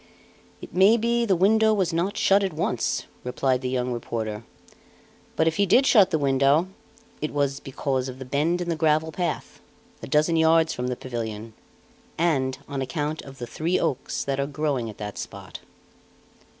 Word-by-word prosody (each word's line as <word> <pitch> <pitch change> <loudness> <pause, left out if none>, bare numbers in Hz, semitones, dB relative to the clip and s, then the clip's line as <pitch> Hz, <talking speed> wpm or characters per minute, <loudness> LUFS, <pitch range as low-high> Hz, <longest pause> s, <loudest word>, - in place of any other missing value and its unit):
"It - - -10
may 195 +5 +5
be 235 +1 +1
the 190 - +3
window 220 +4 +4
was 185 -4 0
not 185 +5 -1
shut 200 +1 +4
at 190 -4 -2
once," 155 - -1 0.2
replied 130 +1 0
the 130 - -2
young 125 -1 -1
reporter. 110 -2 -4 0.9
"But 160 - +2
if 165 - 0
he 200 -1 +3
did 260 +9 +5
shut 205 -8 +6
the 160 - +1
window, 140 +4 +2 0.5
it 155 - -2
was 140 -1 0
because 135 -1 -2
of 130 - -8
the 130 - -8
bend 155 +7 0
in 175 - -3
the 165 - 0
gravel 155 0 +1
path, 170 0 -4 0.4
a - - -7
dozen 155 +4 +2
yards 160 0 +4
from 125 - -3
the 125 - -2
pavilion, 115 -3 -6 0.6
and 135 -6 +1
on 140 -2 -4
account 150 +3 -3
of 135 -1 -12
the 120 - -5
three 165 +8 -1
oaks 135 - -2
that 140 0 -2
are 140 - 0
growing 140 -5 -2
at 105 - -10
that 105 -1 -6
spot." - - -8
150 Hz, 180 wpm, -25 LUFS, 130-175 Hz, 0.9 s, shut